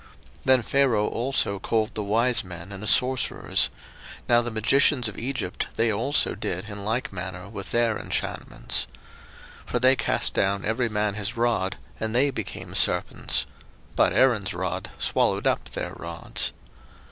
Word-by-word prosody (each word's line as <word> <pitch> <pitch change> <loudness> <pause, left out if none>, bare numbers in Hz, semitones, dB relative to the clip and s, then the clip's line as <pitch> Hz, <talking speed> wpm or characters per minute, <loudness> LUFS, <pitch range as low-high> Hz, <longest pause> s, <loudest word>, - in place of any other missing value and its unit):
02:007:011 - - -22 0.4
Then 130 -1 +5
Pharaoh 125 -7 +2
also 120 -5 0
called 110 +3 0
the 110 - -2
wise 115 +4 +2
men 90 0 -9
and 100 -1 -7
the 105 - -3
sorcerers: 130 +3 +2 0.6
now 120 0 +5
the 120 - -3
magicians 120 +3 +3
of 110 - -6
Egypt, 120 -6 -3
they 115 0 +2
also 130 +8 +2
did 105 -3 -3
in 100 -1 -7
like 110 +1 -2
manner 90 0 -6
with 100 -2 -7
their 115 -2 +1
enchantments. - - -2 0.8
02:007:012 - - -18
For - - 0
they 130 +2 +5
cast 125 - 0
down 100 0 0
every 115 +2 0
man 105 -1 0
his 105 +3 -4
rod, 115 -5 0 0.2
and 110 +1 -2
they 140 +3 +4
became - - -6
serpents: - - +2 0.5
but - - +4
Aaron's 110 -8 +2
rod 95 0 -3
swallowed - - +1
up - - +1
their - - -5
rods. - - -3
110 Hz, 160 wpm, -25 LUFS, 100-120 Hz, 0.8 s, Then